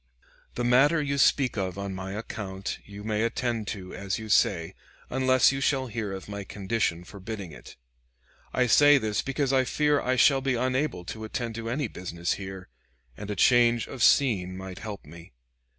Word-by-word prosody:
The 120 - -2
matter 135 +7 +4
you 140 -1 -1
speak 130 -3 +3
of 95 -1 -3
on 100 -1 -4
my 95 +1 -6
account 100 -2 -5
you 105 0 -10
may 105 0 -1
attend 115 -1 -1
to 95 -3 -6
as 100 0 -3
you 110 -1 -8
say, 85 -5 +2 0.4
unless 130 0 +4
you 135 0 -3
shall 135 -1 +1
hear 110 -4 -4
of 95 -1 -7
my 100 -1 -6
condition 95 -3 -2
forbidding 100 -1 -8
it. - - -13 0.8
I 125 - +2
say 145 +4 +6
this 110 -5 -1
because 135 0 -1
I 130 -1 +4
fear 150 +2 +1
I 130 +1 0
shall 135 +2 +4
be 135 -1 0
unable 130 -5 -1
to 110 +4 -7
attend 115 +1 -4
to 115 0 -5
any 135 +2 -1
business 85 -3 -3
here, 95 -1 -8 0.5
and 105 0 -8
a 105 - -2
change 120 +2 +4
of 130 - -8
scene 95 -9 +3
might 95 -1 -8
help 105 -6 -7
me. 85 +1 -13
110 Hz, 185 wpm, -27 LUFS, 95-130 Hz, 0.8 s, say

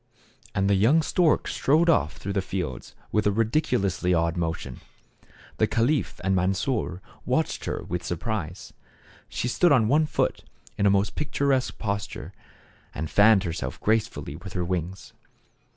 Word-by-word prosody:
And 95 0 +2
the 100 - +3
young 120 +12 +4
stork 170 0 +2
strode 155 +5 +2
off 145 - +2
through 100 - -4
the 100 - +1
fields 90 -8 -5 0.2
with 105 -1 +2
a - - +4
ridiculously 105 - +1
odd 85 +1 +1
motion. 80 -7 -4 0.8
The - - +3
caliph 125 +2 0
and 95 +1 +2
Mansor 95 0 -1 0.2
watched - - -1
her - - -3
with 90 0 -4
surprise. 90 -1 -4 0.6
She - - -2
stood 175 +7 +3
on 120 -6 +4
one 150 +5 +3
foot - - -1 0.3
in 100 - +2
a - - +6
most 100 +1 +2
picturesque 140 -3 0
posture, 100 -3 -4 0.6
and 80 +2 -4
fanned 100 -1 +6
herself 85 -3 -4
gracefully 110 -9 -1
with 90 +3 -9
her 90 -2 -1
wings. 90 +1 -4
100 Hz, 150 wpm, -26 LUFS, 90-120 Hz, 0.8 s, a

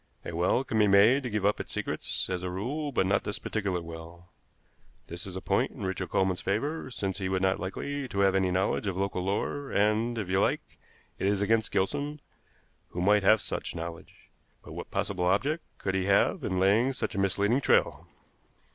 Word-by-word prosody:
A 85 - -5
well 90 +9 +2
can 110 - -1
be 105 - +5
made 105 +8 +6
to 125 - -4
give 105 -2 -1
up 105 - +2
its - - -5
secrets, - - -2
as 90 -1 -2
a 90 - -3
rule, 135 +11 -3
but 95 - +1
not 100 +1 +2
this 105 0 -3
particular 95 -5 -2
well. 85 +1 -10 0.8
This 85 +3 -6
is 95 - -7
a 95 - -4
point - - +1
in - - -8
Richard 95 0 -3
Coleman's 95 -1 +1
favor, 135 +10 -2
since 100 -6 -3
he 95 -1 -2
would 95 0 0
not 95 0 +2
be - - -10
likely 140 +9 -4
to 100 - -4
have 95 -1 +4
any 95 -1 +2
knowledge 95 +3 0
of 95 -2 -2
local 95 -1 -1
lore; 105 +8 -2
and, 110 +3 +2
if 105 -4 -3
you 95 +1 +1
like, - - -1 0.4
it 95 - 0
is 100 0 +1
against 110 +1 +2
Gilson, 145 +9 -1 0.7
who 90 - -6
might 105 +3 +4
have 105 +2 +5
such - - -4
knowledge. 85 0 -8 0.3
But - - -10
what - - -7
possible 90 -3 -1
object 140 - +1
could 95 - -2
he 95 -1 0
have 100 - +3
in 95 -5 -1
laying 110 +8 +3
such 130 - -3
a - - -2
misleading 100 +6 +2
trail?" - - +2
100 Hz, 210 wpm, -29 LUFS, 95-110 Hz, 0.8 s, made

